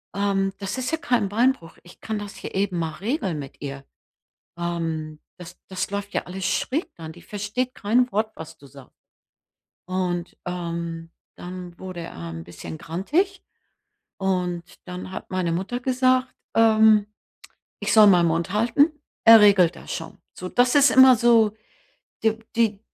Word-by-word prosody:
ähm, 195 -1 0
das 195 +5 -4
ist 255 - -2
ja 320 - 0
kein 235 -9 0
Beinbruch. 230 -6 0
Ich 175 - -17
kann 220 -1 -3
das 205 -1 -8
hier - - -8
eben 190 -3 0
mal 160 -1 -2
regeln 205 - -2
mit 135 -2 -10
ihr. 140 -1 -7 0.7
Ähm, 165 -3 -3 0.2
das 180 0 -11
das 190 0 -3
läuft 200 0 -5
ja - - 0
alles 185 +1 -4
schräg 300 +7 -1
dann, 160 -1 -8
die 175 - -15
versteht 215 +5 -3
kein 245 +4 +1
Wort, 215 +2 0
was 160 - -9
du 140 - -15
sagst.“ 135 -1 -16 0.9
Und, 180 -1 -3
ähm, 170 -2 -4 0.3
dann 180 -1 -9
wurde 185 -2 -7
er 165 - -9
'n 80 0 -7
bisschen 85 - -9
grantig 320 - -1 0.8
und 180 -3 -1 0.2
dann 180 +1 -7
hat - - -8
meine 180 -3 -1
Mutter 195 +8 -3
gesagt, 255 0 +2 0.3
ähm, 220 -2 +5 0.7
ich - - -2
soll 215 -1 +8
meinen 175 -3 +5
Mund 165 +3 -1
halten. 245 +8 +3 0.3
Er 225 0 +10
regelt 190 -5 +5
das - - -10
schon. - - -6 0.2
So, 180 0 -7
das 245 0 +3
ist 285 0 +7
immer 260 -1 +8
so 225 -2 +4 0.7
die 220 0 +2 0.2
die 215 -3 +1
195 Hz, 160 wpm, -24 LUFS, 170-225 Hz, 0.9 s, Er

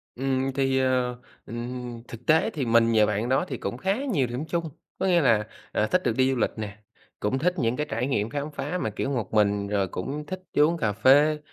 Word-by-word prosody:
Ừm, 135 +1 0
thì, 135 -1 +1
ờ, 125 -1 +1 0.3
ừm, 120 0 -6
thực 115 +1 -10
tế 160 +1 +4
thì 145 -5 -3
mình 115 0 +4
và 110 -1 +6
bạn 105 +3 -1
đó 135 +7 +2
thì - - -4
cũng - - -4
khá 190 +1 0
nhiều 170 - +1
điểm 125 +5 -4
chung, 165 0 -2 0.3
có 190 - 0
nghĩa 175 -3 +4
là, 110 -6 +3 0.2
ờ, 105 - +1
thích 185 - +2
được - - +1
đi 130 0 +4
du 135 - +1
lịch - - +2
nè, 105 -1 -5 0.4
cũng 105 +6 0
thích 180 +5 +2
những 115 -2 +1
cái 150 - -1
trải 125 +2 -1
nghiệm 110 -5 0
khám 145 +2 -4
phá 175 +4 -3
mà, - - -1
kiểu, 105 +6 -3
một 120 -8 -3
mình, 100 -1 +2
rồi 100 -1 0
cũng 135 +13 -5
thích 185 +4 -6
đi - - +3
uống 165 +3 +4
cà 110 -8 0
phê, 140 +8 +5
130 Hz, 240 wpm, -26 LUFS, 115-150 Hz, 0.4 s, và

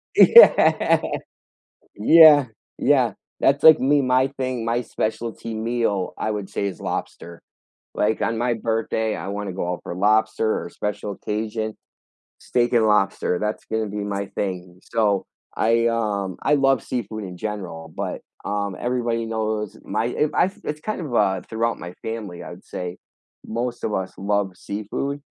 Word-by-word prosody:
Yeah. 470 - +7 0.9
Yeah, 155 -4 +7 0.3
yeah. - - +3 0.3
That's 140 +1 +2
like 160 -1 +9
me, 140 +2 +3
my 130 0 +3
thing- 130 -3 -2
my 120 +1 0
specialty 115 0 -4
meal- 110 -4 -1
I 110 - -1
would 105 -2 -4
say, - - -2
is 100 -2 -4
lobster. 85 0 -5 0.5
Like, 110 +1 0
on 115 - 0
my 120 0 +1
birthday, 110 -1 -1
I - - -6
wanna 100 -1 -4
go 90 -1 -2
out 90 - -6
for - - -6
lobster, 110 +3 +1
or - - -7
special 105 0 -4
occasion- 110 +2 -4 0.6
steak 120 0 0
and 115 -2 +4
lobster- 100 -3 +1
that's 105 0 -3
gonna 110 0 -1
be 105 0 -4
my 100 -1 -3
thing. 90 -2 -5
So, 105 -4 0 0.3
I, 115 +1 +2
um 105 -5 -1
I 150 - +3
love 135 -1 +3
seafood 110 -3 -4
in 90 -2 -8
general, 90 -5 -6
but, - - -4 0.2
um, 100 -2 -2
everybody 120 -2 -1
knows 110 -2 -3
my 110 +3 -1
if 150 +5 -1
I 185 - +3
it's 150 0 -4
kind 215 +4 -4
of, 145 -8 -5
uh, 95 -4 +2
throughout 115 +1 -2
my 90 - -8
family, 110 -6 -5
I - - -9
would - - -12
say, 90 0 -6 0.5
most 120 +2 -3
of 105 - -1
us 95 -1 -3
love 100 -1 -1
seafood, 110 +10 -4
110 Hz, 160 wpm, -23 LUFS, 100-120 Hz, 0.9 s, like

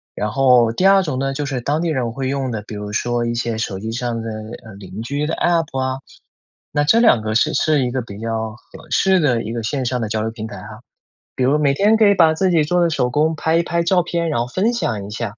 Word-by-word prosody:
然 105 +1 -2
后 125 -2 +4
第 150 +11 -1
二 195 0 +5
种 150 -7 -3
呢， 135 0 -1
就 145 +2 -3
是 135 -2 -3
当 145 +6 -1
地 170 - -1
人 125 -7 -2
会 130 +1 -3
用 135 -1 -2
的， 110 -3 -4
比 105 - -8
如 105 0 -6
说 120 +1 -1
一 120 0 -2
些 115 -1 -2
手 105 -4 -3
机 110 +3 -5
上 120 -1 -3
的， 115 - -5 0.3
呃， 110 -3 -12
邻 100 +1 -9
居 145 +5 -2
的 160 - -2
app 165 -6 0
啊， 130 0 -1 0.7
那 145 0 +1
这 225 +10 +4
两 225 - +5
个 110 0 -3
是 155 +7 +2
是 155 -3 +2
一 125 - -2
个 130 0 -2
比 100 -3 -10
较 115 -1 -3
合 140 +8 -15
适 190 -1 +3
的 125 -8 +1
一 110 - -5
个 115 0 -3
线 130 +4 -2
上 125 +1 -1
的 115 - -2
交 110 0 -2
流 110 +1 -2
平 110 -1 -7
台 105 - -9
哈。 110 +1 -11 0.5
比 130 - 0
如 140 +3 +3
每 145 -2 +2
天 205 +9 +3
可 220 -1 +4
以 - - +5
把 165 -3 +5
自 185 +4 +1
己 165 -4 +3
做 180 +3 +1
的 170 - +3
手 125 -6 0
工 150 +5 +1
拍 160 +1 0
一 170 - +2
拍 170 0 -1
照 180 +1 +2
片、 170 -1 -2
然 130 -7 0
后 120 - -2
分 195 - 0
享 110 - -2
一 - - -9
下， 115 0 -5
130 Hz, 305 characters per minute, -19 LUFS, 115-160 Hz, 0.7 s, 二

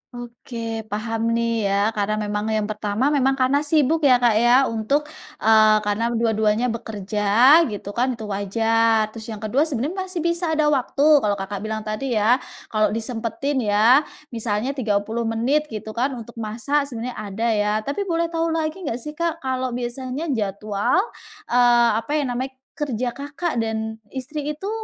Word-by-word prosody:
Oke 230 -2 -6
paham 225 +2 -1
nih 230 -3 0
ya 200 +2 +2
karena 215 -1 -1
memang 210 +1 -2
yang 220 -1 0
pertama 215 +5 -1
memang 270 -2 +2
karena 270 +2 +2
sibuk 300 +1 +2
ya 255 - +7
Kak, 235 -3 +4
ya 245 +3 +5
untuk, 240 +5 0 0.3
eee, 215 -1 +5
karena 210 +3 0
dua 225 0 +1
duanya 220 +3 +1
bekerja 220 - +3
gitu 205 -2 -6
kan 245 +3 0
tuh 215 -2 -7
wajar 225 +2 +1
terus 220 -1 -9
yang 220 -1 -7
kedua 275 +9 +1
sebenarnya 315 +8 -3
masih 360 -3 -4
bisa 340 -1 0
ada 300 -1 +3
waktu 275 +1 0 0.2
kalau 205 -5 0
Kakak, 195 0 -5
bilang 215 +1 -4
tadi 220 +3 -3
ya, 225 +5 +3 0.3
kalau 215 -1 +3
disempetin 235 +4 -2
ya 220 +4 +5 0.3
misalnya 225 +2 -2
30 225 -2 -1
menit 265 +7 +1
gitu 215 -3 -6
kan 255 +4 -1
untuk 235 0 -10
masak 235 +7 -1
sebenarnya 245 -1 -6
ada 220 +4 -2
ya 210 -1 +1
tapi 390 - -3
boleh 335 -1 0
tahu 330 0 0
lagi 320 +1 -3
nggak 235 0 -2
sih 300 - -5
Kak, 330 0 -3
kalau 255 -1 -2
biasanya 255 +5 -4
jadwal, 210 - 0 0.5
eee, 240 -1 +5
apa 230 +6 -8
ya 300 - +1
namanya 260 +2 -3 0.3
kerja 250 -4 -1
Kakak, 285 +2 -4
dan 220 0 -3 0.2
istri 265 +4 -5 0.2
itu 390 +6 -5
235 Hz, 165 wpm, -22 LUFS, 215-275 Hz, 0.5 s, ya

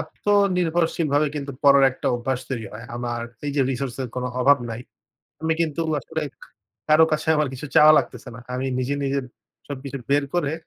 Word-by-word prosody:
আত্মনির্ভরশীলভাবে 170 -6 +1
কিন্তু 140 -1 -4
পড়ার 140 -1 +6
একটা 130 - -7
অভ্যাস 125 +1 -2
তৈরি 120 -4 -3
হয়। 115 +3 -9
আমার 120 -1 -3 0.3
এইযে 140 -1 +1
রিসোর্সের 130 -1 -3
কোনো 125 0 -2
অভাব 140 +2 +5
নাই। 115 +1 -5 0.6
আমি 160 0 +1
কিন্তু 165 -1 -1 0.2
আসলে 160 +5 -4 0.7
কারো 155 +1 +7
কাছে 155 +1 -1
আমার 150 -1 +1
কিছু 130 +3 -6
চাওয়া 155 0 +8
লাগতেছে - - -4
না। 125 - -10
আমি 130 +1 -2
নিজে, 130 +3 -1
নিজে 140 0 0 0.5
সবকিছু 140 -1 -6
বের 145 0 +3
করে 155 -4 0
140 Hz, 165 wpm, -23 LUFS, 130-155 Hz, 0.7 s, চাওয়া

